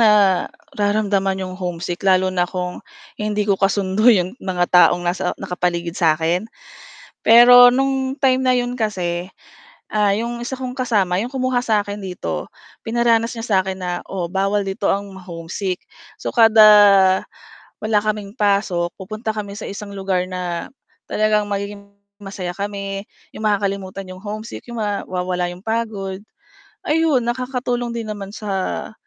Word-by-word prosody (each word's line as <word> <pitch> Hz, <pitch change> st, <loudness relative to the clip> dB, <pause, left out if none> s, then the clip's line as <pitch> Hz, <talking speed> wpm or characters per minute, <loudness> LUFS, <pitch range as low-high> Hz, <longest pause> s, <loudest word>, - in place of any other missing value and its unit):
nararamdaman 205 Hz, -1 st, +2 dB
'yong 185 Hz, -, -6 dB
homesick 175 Hz, 0 st, -4 dB
lalo 185 Hz, -1 st, +3 dB
na 175 Hz, -1 st, 0 dB
kung 180 Hz, -1 st, -4 dB, 0.4 s
hindi 210 Hz, 0 st, 0 dB
ko 200 Hz, -1 st, 0 dB
kasundo 195 Hz, +3 st, +2 dB
'yong 185 Hz, -5 st, +4 dB
mga 180 Hz, -2 st, 0 dB
taong 175 Hz, 0 st, +5 dB
nasa 175 Hz, +2 st, -1 dB
nakapaligid 175 Hz, -2 st, -2 dB
sa 160 Hz, -3 st, +3 dB
akin 170 Hz, +6 st, -1 dB, 0.8 s
pero 245 Hz, +2 st, +9 dB
nung 265 Hz, +1 st, 0 dB
time 260 Hz, -1 st, +3 dB
na 255 Hz, -, +3 dB
'yon 245 Hz, 0 st, 0 dB
kasi, 185 Hz, -6 st, -2 dB, 0.6 s
ah, 210 Hz, -1 st, +2 dB
'yong 235 Hz, +2 st, -3 dB
isa 255 Hz, +2 st, -4 dB
kong 255 Hz, -1 st, -4 dB
kasama, 210 Hz, -8 st, +1 dB
'yong 245 Hz, -, -6 dB
kumuha 255 Hz, -1 st, 0 dB
sa 220 Hz, -3 st, +2 dB
akin 205 Hz, 0 st, -6 dB
dito, 185 Hz, -2 st, -5 dB, 0.3 s
pinaranas 230 Hz, 0 st, +2 dB
niya 230 Hz, 0 st, -5 dB
sa 205 Hz, -, +2 dB
akin 190 Hz, -1 st, -4 dB
na 180 Hz, -1 st, -3 dB, 0.2 s
oo 180 Hz, -3 st, -3 dB
bawal 195 Hz, +1 st, +1 dB
dito 195 Hz, +1 st, -1 dB
ang 200 Hz, +1 st, -2 dB
ma-homesick, 180 Hz, +1 st, -5 dB, 0.4 s
so -, -, -4 dB
kada, 225 Hz, -2 st, +6 dB, 1.2 s
wala 215 Hz, 0 st, +1 dB
kaming 210 Hz, -1 st, -3 dB
pasok 200 Hz, -6 st, +1 dB
pupunta 215 Hz, +3 st, -4 dB
kami 205 Hz, -2 st, -5 dB
sa -, -, -7 dB
isang 200 Hz, +1 st, -7 dB
lugar 190 Hz, -2 st, -1 dB
na 175 Hz, -2 st, -4 dB, 0.4 s
talagang 215 Hz, -1 st, +2 dB
magiging 200 Hz, 0 st, -5 dB, 0.3 s
masaya 195 Hz, -3 st, -5 dB
kami 200 Hz, 0 st, -4 dB, 0.3 s
'yong 220 Hz, -, -7 dB
makakalimutan 195 Hz, -2 st, -1 dB
'yong 185 Hz, +1 st, -10 dB
homesick 215 Hz, +1 st, -6 dB
mawawala 185 Hz, -5 st, -2 dB
'yong 175 Hz, -, -10 dB
pagod 215 Hz, -4 st, -3 dB, 0.7 s
ayun 305 Hz, -5 st, +2 dB
nakakatulong 245 Hz, 0 st, -2 dB
din 230 Hz, -, -3 dB
naman 205 Hz, -2 st, -5 dB
sa 195 Hz, -2 st, -3 dB
200 Hz, 140 wpm, -20 LUFS, 185-225 Hz, 1.2 s, pero